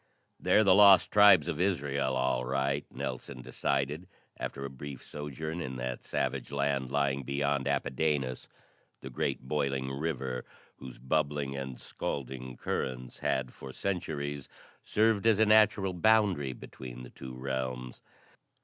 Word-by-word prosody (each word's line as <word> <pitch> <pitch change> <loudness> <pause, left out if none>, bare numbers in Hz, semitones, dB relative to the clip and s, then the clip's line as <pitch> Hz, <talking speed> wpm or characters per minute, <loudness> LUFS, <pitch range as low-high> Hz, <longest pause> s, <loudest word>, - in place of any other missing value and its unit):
"They're 110 - +4
the 95 -3 +6
lost 100 -1 +7
tribes 100 -7 +7
of 75 - -2
Israel, 70 -8 0
all 65 -1 +1
right," 70 +2 -1
Nelson 65 -2 -6
decided 70 +9 -1 0.3
after 70 0 -4
a - - -2
brief 70 0 -8
sojourn 80 +3 -5
in 65 -4 -5
that 65 0 -4
savage - - -2
land 70 -2 0
lying 70 -1 +1
beyond 70 +1 -1
Apidanus 70 -2 -1 0.5
the 65 - -8
great 65 +2 -2
boiling 70 -2 -1
river, 65 -3 -3 0.3
whose 65 -2 -10
bubbling 70 +1 -1
and 65 -2 -5
scalding 65 -2 -5
currents 65 -1 -4
had 65 -2 -1
for 65 - -9
centuries 75 -5 -3 0.3
served 110 0 +2
as 110 -3 +5
a 110 - +5
natural 105 -3 +4
boundary 95 -8 +3
between 60 0 -9
the - - -11
two 65 -1 -9
realms. 65 -1 -4
70 Hz, 135 wpm, -30 LUFS, 65-80 Hz, 0.5 s, lost